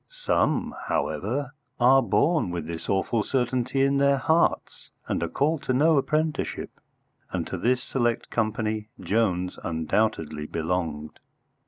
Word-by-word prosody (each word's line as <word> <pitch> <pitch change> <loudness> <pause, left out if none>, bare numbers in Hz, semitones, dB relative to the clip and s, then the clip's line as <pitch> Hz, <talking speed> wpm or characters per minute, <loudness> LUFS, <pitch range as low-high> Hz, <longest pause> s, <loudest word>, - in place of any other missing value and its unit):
Some, - - 0
however, 145 -1 -1 0.3
are 130 +2 +6
born 150 - +2
with 85 -3 -4
this 85 0 -6
awful 100 +4 +1
certainty 130 +1 0
in 140 0 +2
their 140 0 +4
hearts, 160 +5 0 0.2
and - - -1
are - - -1
called 150 +2 0
to 130 - +1
no 155 +5 +4
apprenticeship, 155 +2 -1 0.6
and - - -2
to - - -5
this 125 +1 +1
select 120 -3 -1
company 110 -1 -1
Jones 90 -5 0
undoubtedly 80 -2 -1
belonged. 80 -2 -3
120 Hz, 130 wpm, -26 LUFS, 90-140 Hz, 0.6 s, are